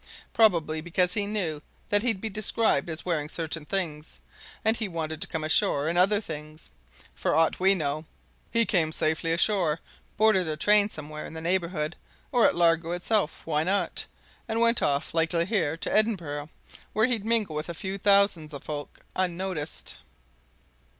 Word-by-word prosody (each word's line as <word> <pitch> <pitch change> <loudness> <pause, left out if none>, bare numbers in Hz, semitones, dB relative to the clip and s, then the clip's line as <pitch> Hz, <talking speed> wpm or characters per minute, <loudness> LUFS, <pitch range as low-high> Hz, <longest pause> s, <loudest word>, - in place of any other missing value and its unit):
Probably 170 -8 +3
because 180 +2 +1
he 200 0 0
knew 175 -8 -2 0.3
that 205 0 +3
he'd 225 -4 0
be 220 - -3
described 215 -1 +1
as 160 -1 -5
wearing 155 -4 -1
certain 160 -1 -4
things, 160 -5 -3 0.5
and 220 +1 +4
he 225 -2 -2
wanted 160 -3 -4
to - - 0
come 160 -3 -4
ashore 155 -1 +2
in 170 - 0
other 195 +4 +4
things. 155 - -9 0.4
For - - -1
aught 160 0 +2
we 190 +1 +4
know, 155 -2 -2 0.4
he 230 0 +2
came 165 -7 +1
safely 160 +1 +1
ashore, 170 -2 +2 0.4
boarded 215 -5 +4
a 155 -1 -2
train 205 +4 +5
somewhere 155 -3 -7
in - - -10
the - - -5
neighbourhood, 170 -2 -1 0.4
or 245 -2 +5
at - - 0
Largo 170 -1 +2
itself 180 -1 -1
why 150 -2 0
not? 190 +5 0 0.4
and 225 0 -1
went 235 0 +3
off, 140 0 0
likely 165 +1 +2
here, 170 -7 0
to - - -3
Edinburgh 170 -10 0 0.4
where 220 +1 +4
he'd 240 -5 0
mingle 220 -7 +1
with 155 +2 -4
a 170 - -5
few 190 +3 -4
thousand 200 -6 +3
of 140 - -9
folk, 145 -1 -7
unnoticed." 185 -3 -2
170 Hz, 170 wpm, -27 LUFS, 155-200 Hz, 0.5 s, train